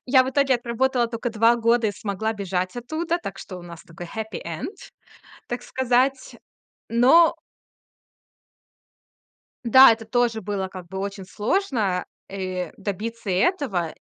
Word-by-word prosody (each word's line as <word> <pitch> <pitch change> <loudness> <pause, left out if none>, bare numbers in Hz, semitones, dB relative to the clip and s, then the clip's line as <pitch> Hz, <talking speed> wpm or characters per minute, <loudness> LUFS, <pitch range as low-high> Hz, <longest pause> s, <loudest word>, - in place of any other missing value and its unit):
Я 260 0 +6
в 260 - -3
итоге 275 -1 +3
отработала 240 +1 0
тока 230 +1 -4
2 230 +2 +4
года 230 0 +2
и 205 - -1
смогла 205 +2 -3
бежать 190 -1 -3
оттуда, 320 +8 -2
так 195 - -7
что 185 - -8
у 175 - -10
нас 170 -1 -11
такой 170 +1 -10
happy 220 -3 -4
end, 170 - -5 0.7
так 245 0 -4
сказать, 260 +1 0 0.5
но 265 +9 +5 2.3
Да, 260 +1 +8
это 225 0 -5
тоже 235 -1 +1
было, 195 -1 -3
как 185 -2 -10
бы, 190 +2 -7
очень 200 0 -5
сложно, 210 - -1 0.2
э, 185 -2 -4
добиться 210 +2 -5
этого. 190 - 0
225 Hz, 135 wpm, -24 LUFS, 190-250 Hz, 2.3 s, Да